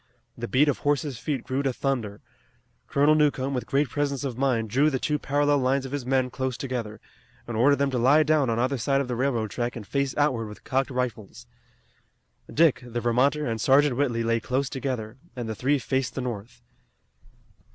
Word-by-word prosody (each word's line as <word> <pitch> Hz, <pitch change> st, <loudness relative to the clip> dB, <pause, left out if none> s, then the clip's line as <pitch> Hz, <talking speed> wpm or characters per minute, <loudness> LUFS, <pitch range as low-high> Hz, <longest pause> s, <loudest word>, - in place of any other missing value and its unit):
The -, -, -5 dB
beat 135 Hz, +9 st, +3 dB
of 145 Hz, -, 0 dB
horses' 145 Hz, -3 st, -1 dB
feet 140 Hz, -6 st, -3 dB
grew 130 Hz, +2 st, -2 dB
to 135 Hz, -1 st, 0 dB
thunder. 120 Hz, -6 st, -3 dB, 0.7 s
Colonel 145 Hz, +2 st, +4 dB
Newcomb 140 Hz, -3 st, +1 dB
with 125 Hz, -3 st, -3 dB
great 140 Hz, +1 st, +1 dB
presence 140 Hz, +1 st, -2 dB
of 135 Hz, -4 st, -3 dB
mind 120 Hz, -4 st, 0 dB
drew 140 Hz, +6 st, +4 dB
the 135 Hz, -, -1 dB
two 150 Hz, +3 st, -1 dB
parallel 145 Hz, +1 st, +2 dB
lines 135 Hz, +1 st, +1 dB
of 135 Hz, -, -7 dB
his 140 Hz, -3 st, -4 dB
men 130 Hz, -1 st, +1 dB
close 130 Hz, -1 st, -3 dB
together, 115 Hz, -5 st, -4 dB, 0.5 s
and 120 Hz, -, -4 dB
ordered 135 Hz, +6 st, +4 dB
them 140 Hz, -1 st, 0 dB
to 125 Hz, -, 0 dB
lie 140 Hz, +6 st, +5 dB
down 150 Hz, -4 st, +2 dB
on 115 Hz, -, 0 dB
either 130 Hz, +2 st, 0 dB
side 135 Hz, +4 st, +1 dB
of 140 Hz, -, -2 dB
the 125 Hz, -, -2 dB
railroad 120 Hz, -4 st, -1 dB
track 120 Hz, +2 st, -3 dB
and 115 Hz, -4 st, -7 dB
face 140 Hz, +3 st, -2 dB
outward 130 Hz, -7 st, +1 dB
with 105 Hz, -, -11 dB
cocked 135 Hz, 0 st, 0 dB
rifles. 125 Hz, -5 st, -4 dB, 1.1 s
Dick, 150 Hz, -5 st, +3 dB
the 120 Hz, -1 st, -4 dB
Vermonter, 130 Hz, +6 st, +2 dB
and 115 Hz, -2 st, -2 dB
Sergeant 135 Hz, +2 st, +4 dB
Whitley 120 Hz, -4 st, 0 dB
lay 115 Hz, 0 st, +1 dB
close 130 Hz, +3 st, -2 dB
together, 125 Hz, -4 st, -4 dB, 0.2 s
and 120 Hz, -3 st, -4 dB
the 110 Hz, -, -3 dB
three 135 Hz, +7 st, +1 dB
faced 130 Hz, 0 st, -2 dB
the 135 Hz, -, -2 dB
north. 115 Hz, -3 st, -6 dB
130 Hz, 200 wpm, -26 LUFS, 120-140 Hz, 1.1 s, lie